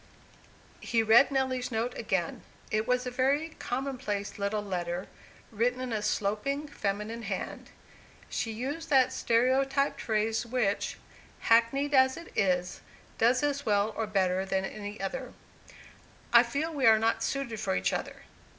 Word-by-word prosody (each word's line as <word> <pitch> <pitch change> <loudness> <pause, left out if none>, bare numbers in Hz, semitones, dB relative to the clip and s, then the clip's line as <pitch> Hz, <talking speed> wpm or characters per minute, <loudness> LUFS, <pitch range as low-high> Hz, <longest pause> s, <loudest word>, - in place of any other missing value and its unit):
He 230 -1 +1
read 225 +5 +6
Nelly's 260 -2 -1
note 230 +2 -1
again. 190 -6 -2 0.3
It 215 +1 0
was 250 0 +1
a 250 - -3
very 275 +5 +1
commonplace 245 -7 -3
little 205 +1 -1
letter, 180 -2 -3 0.5
written 240 +3 0
in 255 -2 -3
a 215 - -1
sloping, 215 +8 -1
feminine 215 -3 -3
hand. 200 -4 -5 0.6
She 225 - -3
used 280 +9 -4
that 265 -3 +4
stereotyped 270 +4 +1
phrase 220 0 0
which, 235 -4 -1 0.4
hackneyed 235 +6 +3
as 260 -1 +5
it 335 - -11
is, 180 -3 0 0.4
does 245 +4 +3
as 285 -1 0
well 210 -2 +1
or 225 - -2
better 190 -2 +1
than 190 0 -1
any 205 +1 -7
other, 255 +6 -4 1.0
"I 235 - +10
feel 280 +7 -2
we 270 -5 +2
are 220 -1 +8
not 225 +1 +1
suited 255 -6 -2
for - - -1
each 95 0 0
other." - - -5
230 Hz, 145 wpm, -29 LUFS, 205-260 Hz, 1.0 s, I